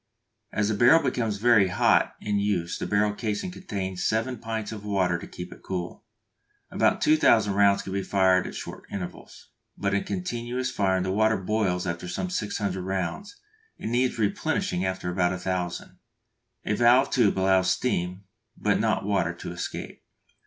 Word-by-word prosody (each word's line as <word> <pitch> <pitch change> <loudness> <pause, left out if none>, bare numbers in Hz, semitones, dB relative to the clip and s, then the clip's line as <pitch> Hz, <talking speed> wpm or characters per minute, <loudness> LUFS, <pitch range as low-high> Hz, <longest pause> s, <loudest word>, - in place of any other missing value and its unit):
As 105 -1 0
the - - +1
barrel 125 +10 +5
becomes 110 -4 -1
very 110 -3 +5
hot 90 - +2
in 105 -1 -1
use 95 -5 -1
the - - -3
barrel 105 0 +2
casing 110 - -3
contains 95 - -4
seven 115 +4 0
pints 110 -2 -4
of 105 -2 -7
water 95 -4 0
to - - -9
keep 90 0 -8
it - - -17
cool. 90 -2 -5 0.7
About - - +2
2000 115 -9 +4
rounds 100 0 +4
can 95 - -6
be 100 - 0
fired 95 -1 +2
at - - -8
short - - -8
intervals; 95 -3 -8 0.3
but 100 0 -1
in 100 - +1
continuous 120 +6 -3
firing 95 -2 +1
the 95 - -1
water 110 +2 +2
boils 95 -2 -1
after 85 0 -4
some 180 - -3
600 100 - -2
rounds, 95 - -4 0.4
and 110 - -5
needs 125 +1 +1
replenishing 100 -4 0
after 95 -1 -2
about 90 0 +1
1000. 90 -1 -4 0.7
A - - 0
valved 120 +4 +4
tube 110 -7 +3
allows 95 -1 +3
steam, 90 -3 -1 0.3
but - - +1
not - - 0
water 95 -4 0
to 85 - -7
escape. 85 - -6
100 Hz, 165 wpm, -26 LUFS, 95-110 Hz, 0.7 s, barrel